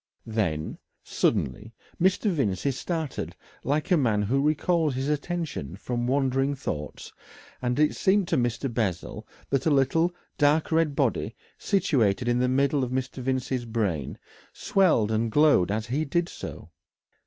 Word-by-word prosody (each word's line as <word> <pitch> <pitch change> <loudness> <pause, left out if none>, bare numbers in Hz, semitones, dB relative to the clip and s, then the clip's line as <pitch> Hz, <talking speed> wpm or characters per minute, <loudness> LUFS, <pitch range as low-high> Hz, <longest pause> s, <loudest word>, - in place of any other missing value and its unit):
Then, 95 -9 -2 0.2
suddenly, 110 +2 -1 0.3
Mr. 190 +3 +3
Vincey 135 - 0
started 160 +2 -4 0.3
like 145 +6 -1
a 180 - +6
man 110 -7 +2
who 130 +7 +1
recalls 155 0 +1
his 135 +2 -2
attention 150 - -3
from 120 +4 -3
wandering 135 +1 +1
thoughts, 75 - -6 0.5
and 125 0 -1
it 150 0 +3
seemed 195 -1 +2
to - - +2
Mr. 120 +1 -1
Bessel 100 -8 -3 0.2
that 135 +2 +1
a - - +5
little 150 +5 +3 0.3
dark 150 +2 +3
red 160 -3 +2
body 120 -5 0 0.2
situated 125 - +1
in 120 0 +2
the 125 0 +2
middle 140 +1 +2
of 125 - -2
Mr. 130 +1 -3
Vincey's 130 -1 -1
brain 100 - -2 0.3
swelled 160 - +2
and 110 +1 0
glowed 145 - +4
as 110 +2 -1
he 135 +6 -1
did 170 +4 0
so. - - -8
130 Hz, 145 wpm, -26 LUFS, 115-150 Hz, 0.5 s, a